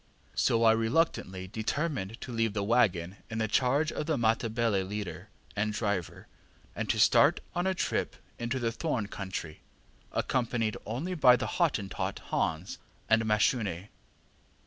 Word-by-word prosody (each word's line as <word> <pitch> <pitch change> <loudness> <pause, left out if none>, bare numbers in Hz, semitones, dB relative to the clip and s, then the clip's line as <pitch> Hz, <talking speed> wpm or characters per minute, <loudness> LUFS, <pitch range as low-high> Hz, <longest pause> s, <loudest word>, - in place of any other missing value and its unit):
So 115 0 +2
I 110 - +7
reluctantly 110 - 0
determined 110 - -2
to 125 - -6
leave 115 -2 0
the 100 -2 -1
waggon 100 -5 +2
in 115 - -4
the 110 -1 +1
charge 135 +7 +2
of 150 - -4
the 155 -3 +1
Matabele 115 -2 +1
leader 100 0 -5 0.3
and 105 +1 0
driver, 100 -4 -2 0.5
and - - -3
to - - +2
start - - +5
on 175 +2 0
a 190 - +1
trip - - -1 0.2
into 120 +2 -2
the 115 -2 0
thorn 125 -5 -2
country, 95 -5 -6 0.5
accompanied 115 -3 0
only 135 - -3
by 130 -7 +6
the 125 - -2
Hottentot 140 - -1
Hans, 80 +4 -1 0.3
and 110 0 +5
Mashune. 105 - +1
115 Hz, 145 wpm, -30 LUFS, 100-125 Hz, 0.5 s, I